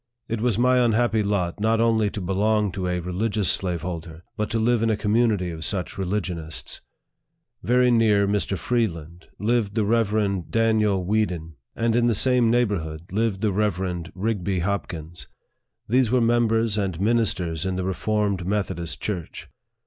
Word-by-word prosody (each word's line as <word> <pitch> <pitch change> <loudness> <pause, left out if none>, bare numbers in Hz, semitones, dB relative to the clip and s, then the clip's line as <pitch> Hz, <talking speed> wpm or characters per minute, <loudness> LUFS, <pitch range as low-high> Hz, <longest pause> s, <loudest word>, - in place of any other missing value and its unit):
It 115 -1 -3
was 120 -3 +1
my 125 +1 +4
unhappy 115 -1 +2
lot 100 -3 -1
not 110 +2 +2
only 110 -2 +2
to 105 - -6
belong 105 +3 +1
to 90 -1 -3
a 90 0 -1
religious 95 +3 -1
slaveholder, 85 -2 -3
but 105 -1 -2
to 115 - -1
live 115 +1 +2
in 115 - +2
a 110 - +1
community 105 -4 +1
of 80 -1 -7
such 95 -1 -2
religionists. 90 -4 -4 0.8
Very 125 +1 +3
near 105 -4 +3
Mr. 100 -1 0
Freeland 85 -6 -2
lived 110 -1 0
the 110 -2 +1
Rev. 105 -4 0
Daniel 110 -4 +2
Weeden, 90 -6 -1 0.2
and 115 0 +1
in 120 0 +3
the 115 - +2
same 125 +1 +4
neighborhood 95 -8 -1
lived 105 -1 0
the 110 - +1
Rev. 95 -4 -1
Rigby 95 -2 -1
Hopkins. 85 -6 -4 0.6
These 125 +1 +3
were 125 +2 +3
members 115 -2 +2
and 95 -5 -2
ministers 95 -7 0
in 95 -1 -2
the 95 - -2
Reformed 100 0 -1
Methodist 90 -5 -2
Church. 90 -6 -5
105 Hz, 155 wpm, -24 LUFS, 90-115 Hz, 0.8 s, my